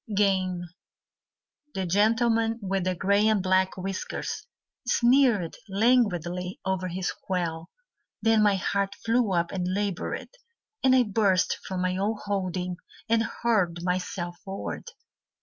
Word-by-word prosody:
Game 190 -3 +1 1.1
The 190 - -1
gentleman 225 +4 +2
with 195 -3 -1
the 185 0 0
grey 200 +4 +3
and 215 -3 +2
black 185 0 +2
whiskers 190 +1 -4 0.4
Sneered 240 -8 +3
languidly 190 -5 +1
over 190 -1 -1
his 180 +1 -2
quail. 170 -3 -3 0.5
Then 225 0 +3
my 205 -1 +4
heart 200 +1 -1
flew 230 -2 +2
up 170 -2 +1
and 180 -2 -2
laboured, 200 -3 -2 0.5
And 260 -1 +5
I 255 - +6
burst 200 -4 +2
from 185 -1 -2
my 185 0 0
own 205 +3 0
holding 185 -3 -2 0.3
And 230 0 +4 0.2
hurled 180 -8 +1
myself 180 -1 -2
forward. 195 0 -5
195 Hz, 125 wpm, -27 LUFS, 180-215 Hz, 1.1 s, I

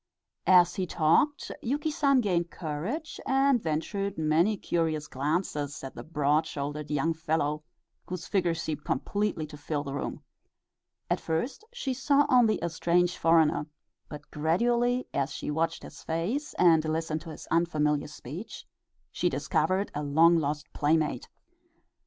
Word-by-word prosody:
As 180 -2 +6
he 185 -1 -1
talked 170 - +2
Yuki 290 +6 -1
San 275 -3 +3
gained 175 -5 0
courage, 180 - -4
and 270 -2 +3
ventured 195 +5 -2
many 160 +7 +2
curious 160 -4 -1
glances 145 0 -2
at 135 - -6
the - - -8
broad 150 0 +1
shouldered 145 0 -5
young 150 +3 +1
fellow, 155 -2 -1 0.4
whose 180 -2 -5
figure 180 -4 +1
seemed 160 -2 -4
completely 200 +3 -1
to 150 0 -11
fill 145 0 -3
the 140 -2 -5
room. 140 - -4 0.8
At - - 0
first 235 - -2
she 395 - -3
saw 280 +2 +3
only 245 -5 +4
a 170 - 0
strange 175 +2 +2
foreigner, 160 -2 +3 0.4
but 150 -1 -10
gradually, 240 +11 +1
as 140 +1 0
she - - -4
watched 165 +2 -1
his - - -11
face 200 - -2
and 165 -3 +5
listened 160 0 -2
to 165 - -10
his 155 - -9
unfamiliar 150 -3 +1
speech, 150 - -8 0.5
she - - 0
discovered 190 +2 0
a 150 - -3
long 160 +4 +5
lost 150 -2 -1
playmate. 150 -3 0
165 Hz, 145 wpm, -28 LUFS, 150-200 Hz, 0.8 s, As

